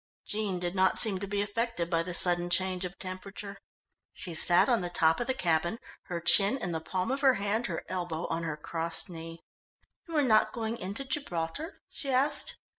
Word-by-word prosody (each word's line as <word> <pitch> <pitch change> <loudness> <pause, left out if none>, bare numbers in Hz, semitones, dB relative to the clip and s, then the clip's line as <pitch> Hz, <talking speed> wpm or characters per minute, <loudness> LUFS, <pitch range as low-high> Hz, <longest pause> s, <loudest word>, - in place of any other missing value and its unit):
Jean 210 -3 -2
did 175 0 -3
not 190 -1 +2
seem 205 -5 +4
to 200 - -4
be 200 +1 0
affected 230 -3 -2
by 165 -1 +1
the 180 +2 -5
sudden 175 0 +5
change 185 +1 0
of 180 +1 -7
temperature. 195 +2 -7 0.5
She 175 - -3
sat 175 +2 +4
on 240 -5 +2
the 175 - -3
top 165 -2 +3
of 240 - -2
the 260 - 0
cabin, 170 +1 0 0.3
her 175 -1 -4
chin 195 +8 +5
in 180 -9 -3
the 160 -1 -3
palm 185 +7 -2
of 275 +1 -1
her 265 -3 +5
hand, 205 +4 -1
her 170 -4 -4
elbow 175 -3 -3
on 165 - -2
her 160 -2 -3
crossed 165 +3 -2
knee. 165 0 -9 0.6
"You 330 -2 -3
are 295 - +4
not 220 -4 +3
going 230 0 -3
into 200 +8 -4
Gibraltar?" 265 - -4
she 275 - -6
asked. 265 +3 +1
185 Hz, 200 wpm, -29 LUFS, 175-225 Hz, 0.6 s, sudden